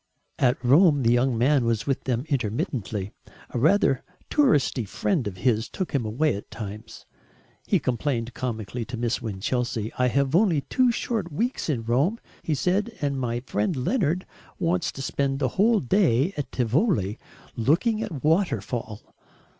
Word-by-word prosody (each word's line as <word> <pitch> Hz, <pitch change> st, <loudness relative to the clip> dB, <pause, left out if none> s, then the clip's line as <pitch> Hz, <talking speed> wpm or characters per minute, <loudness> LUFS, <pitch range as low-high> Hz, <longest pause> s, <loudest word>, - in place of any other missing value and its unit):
At 125 Hz, 0 st, +3 dB
Rome 145 Hz, +1 st, +5 dB
the 115 Hz, -, +4 dB
young 120 Hz, 0 st, +2 dB
man 135 Hz, +3 st, +3 dB
was 115 Hz, -2 st, 0 dB
with 135 Hz, -2 st, -1 dB
them 125 Hz, 0 st, -1 dB
intermittently. 115 Hz, -, -2 dB, 0.4 s
A 120 Hz, -, -2 dB
rather 155 Hz, -, +3 dB, 0.3 s
"touristy" 180 Hz, -, +3 dB
friend 130 Hz, -, -1 dB
of 95 Hz, -2 st, -6 dB
his 110 Hz, +3 st, +1 dB
took 185 Hz, -, -4 dB
him 125 Hz, -6 st, 0 dB
away 145 Hz, +8 st, +1 dB
at 100 Hz, -, -8 dB
times. 110 Hz, +1 st, -8 dB, 0.6 s
He -, -, +3 dB
complained 120 Hz, -2 st, -2 dB
comically 120 Hz, -1 st, -4 dB
to 120 Hz, +1 st, -6 dB
Miss 120 Hz, +1 st, -1 dB
Winchelsea. 115 Hz, +1 st, -2 dB
"I 125 Hz, -, +4 dB
have 140 Hz, +4 st, +1 dB
only 175 Hz, -6 st, +3 dB
two 255 Hz, -, +2 dB
short 220 Hz, -6 st, -2 dB
weeks 230 Hz, -, -2 dB
in 125 Hz, -7 st, -1 dB
Rome," 140 Hz, -, +1 dB, 0.2 s
he 155 Hz, -, -1 dB
said, 200 Hz, -, 0 dB
"and 140 Hz, -2 st, -1 dB
my 120 Hz, -1 st, -2 dB
friend 115 Hz, -, -1 dB
Leonard 180 Hz, -, 0 dB, 0.3 s
wants 175 Hz, -1 st, 0 dB
to 135 Hz, -, -6 dB
spend 135 Hz, 0 st, -1 dB
a 130 Hz, -, +2 dB
whole 215 Hz, -, +3 dB
day 155 Hz, -, +2 dB
at 145 Hz, -, -4 dB
Tivoli, 125 Hz, -, +1 dB, 0.4 s
looking 170 Hz, -, +2 dB
at -, -, -3 dB
a 150 Hz, -, -5 dB
waterfall." 150 Hz, -, -1 dB
135 Hz, 160 wpm, -25 LUFS, 115-170 Hz, 0.6 s, Rome